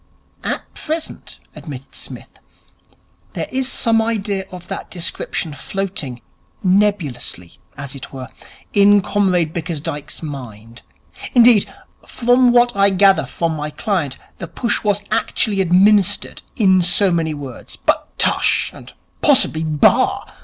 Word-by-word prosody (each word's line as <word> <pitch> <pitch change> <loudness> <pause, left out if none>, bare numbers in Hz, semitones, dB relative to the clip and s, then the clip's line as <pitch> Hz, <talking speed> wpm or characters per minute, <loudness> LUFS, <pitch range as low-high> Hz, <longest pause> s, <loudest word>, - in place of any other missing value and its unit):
'At - - -4
present,' 315 +1 -6 0.2
admitted 135 -4 -9
Psmith, - - -11 0.9
'there - - -3
is 265 0 -1
some 225 -2 +2
idea 205 -4 -2
of 180 -1 -10
that - - -6
description 170 -2 -3
floating 150 -6 -4 0.4
nebulously, 180 - 0 0.2
as 140 -1 -6
it 135 -2 -9
were 130 -3 -8 0.4
in 205 0 +5
Comrade 180 -5 +1
Bickersdyke's 155 -3 -5
mind. 120 -6 -9 0.5
Indeed, 235 -4 +6 0.3
from 245 +1 +3
what 240 -1 +4
I 200 0 +4
gather 195 0 +4
from 165 -1 -2
my 150 0 -4
client, 165 - -2 0.2
the 170 - -5
push 235 +8 -2
was 205 -1 +1
actually 200 -3 0
administered, 195 +2 +3
in 190 -4 +4
so 185 +2 +3
many 160 -2 0
words. 135 -4 -9
But - - -1
tush! - - +2
And - - -13 0.3
possibly 160 0 +3
bah! 155 -2 +2
185 Hz, 125 wpm, -19 LUFS, 150-205 Hz, 0.9 s, Indeed